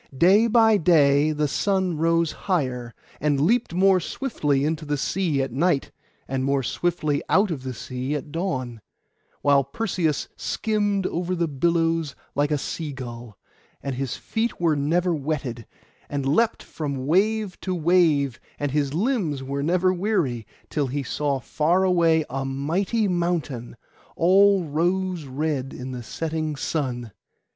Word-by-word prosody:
Day 195 - +5
by 225 -2 +5
day 150 -4 +4
the 150 0 0
sun 190 +2 0
rose 165 +1 +2
higher, 130 -10 -2 0.2
and 145 -2 +1
leaped 210 - +2
more 190 +2 +4
swiftly 150 - -1
into 160 +1 -1
the 145 -1 -1
sea 150 -1 0
at 135 - -4
night, 145 +2 +1 0.4
and 130 0 -2
more 135 0 +1
swiftly 155 -2 -1
out 195 +2 +3
of 145 -5 -3
the 130 -1 -5
sea 130 +5 -4
at 145 0 -5
dawn; 130 - -3 0.6
while 140 -1 +5
Perseus 165 0 -1
skimmed 205 -3 -1
over 180 +1 -1
the 170 -1 0
billows 165 0 0 0.2
like 145 +1 +1
a 150 - +1
sea 150 +2 -4
gull, 120 -5 -8 0.5
and 140 - -2
his 130 0 -3
feet 225 +2 -2
were 165 -3 +2
never 170 +5 +1
wetted; 135 -6 -3 0.4
and 140 -2 -2
leapt 220 +12 +2
on - - -20
from 140 -4 -3
wave 205 +5 +1
to 185 -1 -2
wave, 155 -6 +2 0.2
and 145 -1 -2
his 145 0 0
limbs 180 - 0
were 140 +1 -3
never 180 +4 +2
weary, 175 - -1 0.2
till 145 -3 0
he 140 +2 -2
saw 140 +2 -1
far 160 +9 +1
away 165 -4 +3
a 135 +1 -3
mighty 170 - 0
mountain, 170 -10 -2 0.4
all 195 +2 +5
rose 175 +2 -1
red 135 0 -2
in 130 +1 -6
the 125 -1 -5
setting 155 +5 -3
sun. 125 -6 -3
155 Hz, 150 wpm, -24 LUFS, 135-180 Hz, 0.6 s, Day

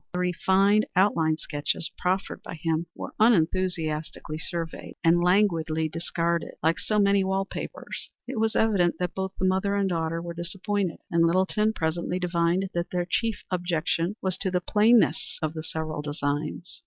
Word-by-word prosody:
The 180 - -1
refined 190 +4 +3
outline 165 -5 +3
sketches 150 +1 -2
proffered 190 +1 -1
by - - -7
him 165 +1 -1
were - - -7
unenthusiastically 165 -7 +1
surveyed 165 0 -5
and 170 +1 +5
languidly 165 -4 +2
discarded 170 +1 -2
like 160 +2 +2
so 215 - -1
many 200 -1 +4
wall 190 0 0
papers. - - -6 0.2
It 250 -2 -3
was 220 0 +1
evident 195 -6 +3
that 180 -1 -2
both 190 0 -3
the 190 - 0
mother 190 +2 +1
and 200 -1 +1
daughter 165 -2 -1
were 170 0 -5
disappointed, 185 +1 -2
and 165 0 +4
Littleton 190 +5 +2
presently 170 0 -1
divined 180 +1 0
that 170 0 -2
their 180 -1 -1
chief 225 +2 -1
objection 175 +1 0
was 190 -2 -1
to 190 - 0
the 180 0 +1
plainness 215 +5 +3
of 155 -1 -2
the 160 - -5
several 155 -1 -4
designs. 150 +4 -3
175 Hz, 160 wpm, -26 LUFS, 165-195 Hz, 0.2 s, and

